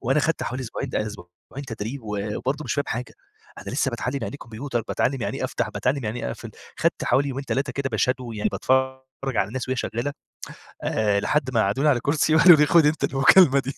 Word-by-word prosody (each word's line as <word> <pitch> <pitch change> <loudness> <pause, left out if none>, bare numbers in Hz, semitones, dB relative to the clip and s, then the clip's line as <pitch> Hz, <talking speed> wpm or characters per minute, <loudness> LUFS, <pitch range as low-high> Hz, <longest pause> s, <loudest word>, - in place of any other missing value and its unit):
وأنا 135 +5 +2
خدت 165 - 0
حوالي 130 +1 -3
أسبوعين 115 - -5
ده 110 - -1
أسبوعين 100 +7 -10
تدريب 115 +3 -5
وبرضه 110 +8 -3
مش - - -2
فاهم 145 0 0
حاجة! 125 +2 -4 0.4
أنا - - -7
لسه - - +1
باتعلم 135 +2 -3
يعني - - -4
إيه 140 - -8
كمبيوتر، 120 +1 -4
باتعلم 130 -1 0
يعني - - -3
إيه - - -2
أفتح، - - -2
باتعلم 130 -1 -1
يعني 110 +3 -3
إيه - - -2
أقفل. - - -8 0.3
خدت - - 0
حوالي 140 +1 +2
يومين 135 +1 -4
3 135 0 -1
كده 140 -2 -3
باshadow 125 +2 0
يعني 105 - 0
باتفرج 130 0 -1
على 95 - +1
الناس 130 +2 -5
وهي 130 - -1
شغالة، 120 +5 -2 0.7
آآ 105 -2 +1
لحد 130 +4 0
ما 115 - +3
قعدوني 130 +10 +2
على 130 -4 +3
كرسي 155 +4 +1
وقالوا 170 0 +8
لي 150 - +5
خُد 165 0 +5
أنت 150 +1 +1
المكالمة 140 +1 +6
دي 135 +1 -4
130 Hz, 215 wpm, -24 LUFS, 115-140 Hz, 0.7 s, وقالوا